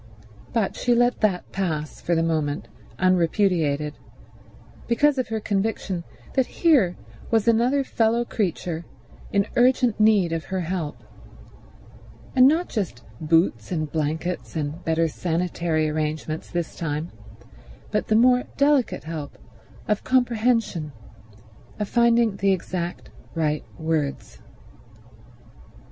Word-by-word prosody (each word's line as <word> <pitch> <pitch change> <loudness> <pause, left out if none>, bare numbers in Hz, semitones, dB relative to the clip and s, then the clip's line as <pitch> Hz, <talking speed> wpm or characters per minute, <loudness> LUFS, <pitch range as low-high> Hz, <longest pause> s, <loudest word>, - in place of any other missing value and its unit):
—but 225 -5 0
she 245 -1 +2
let 245 +1 +2
that 195 -5 0
pass 155 -6 -3
for 170 - 0
the 165 - +2
moment 155 -3 -1 0.3
unrepudiated, 170 -5 +2 0.9
because 280 +4 +3
of 255 - -1
her 220 0 -2
conviction 200 -3 -2 0.3
that 265 -2 +2
here 265 - +3 0.3
was 225 -1 +2
another 245 +5 +3
fellow 230 -1 +1
creature 175 -6 -2 0.5
in 200 0 +2
urgent 245 -2 +3
need 210 -5 +4
of 165 -1 -3
her 190 -1 -2
help; 170 -3 -4 1.3
and 255 0 +8
not 325 +5 +2
just 160 - -3 0.2
boots 160 - +2
and 155 -4 -2
blankets 160 +4 -2
and 155 +2 -3
better 165 0 +1
sanitary 165 -1 -1
arrangements 155 0 -3
this 175 -2 -3
time, 155 0 -3 0.8
but 210 - 0
the 215 - +2
more 250 +2 +5
delicate 280 -3 +2
help 155 -3 -6 0.5
of 210 -1 0
comprehension, 230 - +1 0.9
of 210 - -2
finding 235 -3 +3
the 195 0 +2
exact 175 -1 -3 0.2
right 155 -2 0
words. 155 - -2
180 Hz, 115 wpm, -24 LUFS, 160-230 Hz, 1.3 s, and